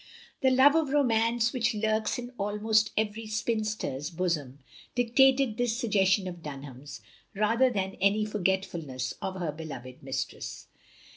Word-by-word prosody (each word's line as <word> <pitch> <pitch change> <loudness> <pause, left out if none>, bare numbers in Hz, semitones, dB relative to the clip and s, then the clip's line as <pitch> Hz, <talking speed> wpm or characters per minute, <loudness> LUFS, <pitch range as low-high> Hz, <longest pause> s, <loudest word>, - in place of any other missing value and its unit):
The 265 - +5
love 260 +2 +6
of 320 -3 +2
romance 235 -4 +2
which 240 -3 0
lurks 215 +1 0
in 245 0 -6
almost 210 +2 +2
every 220 +1 -1
spinster's 215 - -2
bosom, 165 -7 -2 0.4
dictated 255 0 +4
this 240 -2 0
suggestion 195 -5 +2
of 175 -2 -7
Dunham's, 140 -2 -9 0.3
rather 230 +5 +3
than 195 -4 -3
any 205 +2 +3
forgetfulness 175 -10 -2
of 190 - -3
her 175 -4 -2
beloved 140 -5 -8
mistress. 135 -1 -5
210 Hz, 130 wpm, -28 LUFS, 170-230 Hz, 0.4 s, love